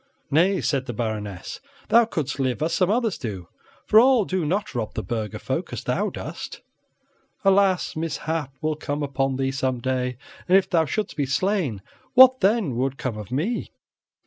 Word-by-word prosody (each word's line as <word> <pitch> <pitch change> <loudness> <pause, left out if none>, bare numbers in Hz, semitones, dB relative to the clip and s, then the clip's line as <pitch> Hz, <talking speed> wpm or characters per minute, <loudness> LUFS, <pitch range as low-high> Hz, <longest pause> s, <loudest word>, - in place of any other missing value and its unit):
"Nay," 180 +5 +3
said 135 -3 -1
the 120 - -3
Baroness, 105 -5 -4 0.3
"thou 235 +1 +6
couldst 150 - -3
live 130 +2 0
as 165 - 0
some 185 -2 +2
others 225 -2 0
do, 100 - -5 0.4
for 215 - +6
all 250 -3 +5
do 185 -2 -1
not 200 +6 -1
rob 115 -4 -3
the - - -3
burgher 110 -3 -3
folk - - -3
as - - -5
thou - - 0
dost. - - -7 0.8
Alas! 195 -2 +3
mishap 160 -2 -3
will 155 0 0
come 150 -1 -3
upon 135 -1 -1
thee 135 0 0
some 130 -2 -1
day, 125 0 -2 0.3
and 185 +1 +6
if 195 - +2
thou 165 -2 +2
shouldst 215 +7 -3
be 145 -3 -1
slain, 145 - 0 0.3
what 260 0 +8
then 195 - +2
would 135 +1 -1
come 130 -4 -3
of 105 +1 -8
me?" 170 - -1
150 Hz, 175 wpm, -24 LUFS, 130-195 Hz, 0.8 s, what